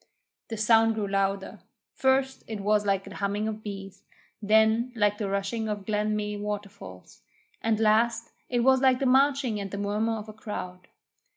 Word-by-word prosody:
The 225 - -5
sound 225 +1 +4
grew 210 -2 -2
louder. 195 0 -1 0.3
First, 265 0 +1
it 220 -2 -5
was 210 +1 +1
like 195 -1 +1
the 195 - -10
humming 205 +2 -2
of 215 0 -4
bees, 195 -2 -8 0.4
then 220 +3 +3
like 210 -1 +1
the 205 -3 -2
rushing 200 +3 -2
of 205 -2 -4
Glen 210 0 0
Meay 210 0 -3
waterfall, 200 - -6 0.6
and 225 -1 +1
last 225 +1 +2 0.2
it 245 -1 +1
was 260 +1 +4
like 260 -2 +4
the 275 - -2
marching 265 -3 +3
and 200 -1 -5
the 200 - -6
murmur 210 +3 -1
of 210 0 -8
a 215 - -9
crowd. 185 -4 -7
215 Hz, 175 wpm, -27 LUFS, 200-225 Hz, 0.6 s, sound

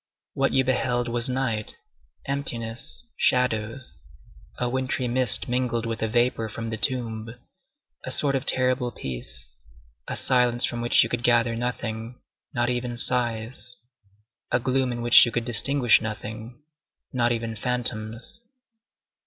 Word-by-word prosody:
What 135 0 +1
you 135 - +4
beheld 125 -1 0
was 120 +1 +2
night, 125 -5 -2 0.5
emptiness, 120 -4 -2
shadows, 115 - 0 0.6
a 125 - -1
wintry 130 0 -1
mist 125 -1 +2
mingled 120 -2 -1
with 115 0 -3
a 110 - +1
vapor 120 -1 +1
from 115 +1 -6
the - - -1
tomb, 115 -2 0 0.7
a - - -5
sort 140 -1 +2
of 135 - -1
terrible 125 -1 +2
peace, 65 - -5 0.5
a - - -3
silence 125 -1 +2
from 120 - -3
which 120 - +5
you - - -3
could 120 - -2
gather 120 -1 +3
nothing, 120 0 -4 0.3
not 120 -1 0
even 120 -1 -2
sighs, 120 -1 0 0.8
a 120 - +3
gloom 130 +1 0
in 120 -1 -4
which 120 0 +8
you 120 - +1
could 120 0 -2
distinguish 125 +2 +4
nothing, 110 +4 -7 0.5
not 120 -2 +2
even 115 -1 -2
phantoms. 115 - -2
120 Hz, 135 wpm, -25 LUFS, 115-125 Hz, 0.8 s, which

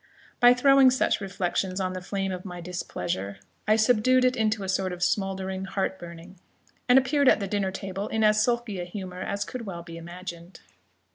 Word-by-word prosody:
By 245 0 +7
throwing 275 0 +6
such 255 -4 +1
reflections 190 -1 -2
on 185 -1 -2
the 185 - -5
flame 195 +1 -3
of 180 -1 -5
my 180 -2 -7
displeasure, 170 - -4 0.3
I 215 - +5
subdued 250 +3 +3
it 255 0 +2
into 215 -3 0
a - - -4
sort 190 -1 -1
of 180 0 -4
smouldering 190 -1 -1
heart 190 0 -2
burning, 170 +2 -11 0.5
and 250 - +7
appeared 270 +1 +4
at - - +4
the 200 - -3
dinner 195 -1 -1
table 195 +1 -5
in 220 0 -1
as 215 0 +4
sulky 235 -4 -1
a - - -3
humour 185 0 -7
as 200 +1 -3
could 240 -4 -7
well 170 -3 -6
be 165 -1 -9
imagined. 175 +1 -9
195 Hz, 195 wpm, -26 LUFS, 180-220 Hz, 0.5 s, By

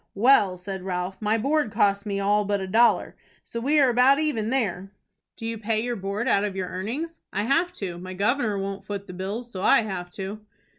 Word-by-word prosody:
"Well," 205 -4 +4
said 190 +1 -6
Ralph, 180 +1 -4
"my 215 +1 +2
board 280 0 +1
costs 200 +1 +2
me 200 -1 -1
all 205 +1 +2
but 205 0 0
a 190 - -3
dollar. 230 +5 +3 0.3
So 235 - -6
we 290 +6 +2
are 265 -3 +5
about 250 +3 +5
even 285 -8 0
there." 195 -8 -1 0.5
"Do 225 - -8
you 225 -1 -3
pay 215 0 0
your 240 +1 -2
board 200 +3 -3
out 200 -5 +3
of 205 -2 -2
your 185 -1 -3
earnings?" 265 - -4
"I 205 - -1
have 330 +9 +2
to. 180 - -5
My 185 +1 -7
governor 215 +1 +1
won't 195 0 -4
foot 200 0 -5
the 185 - -9
bills, 205 +7 -5
so 185 - -6
I 205 - +5
have 185 -4 -5
to." 200 +2 -6
205 Hz, 215 wpm, -25 LUFS, 195-240 Hz, 0.5 s, are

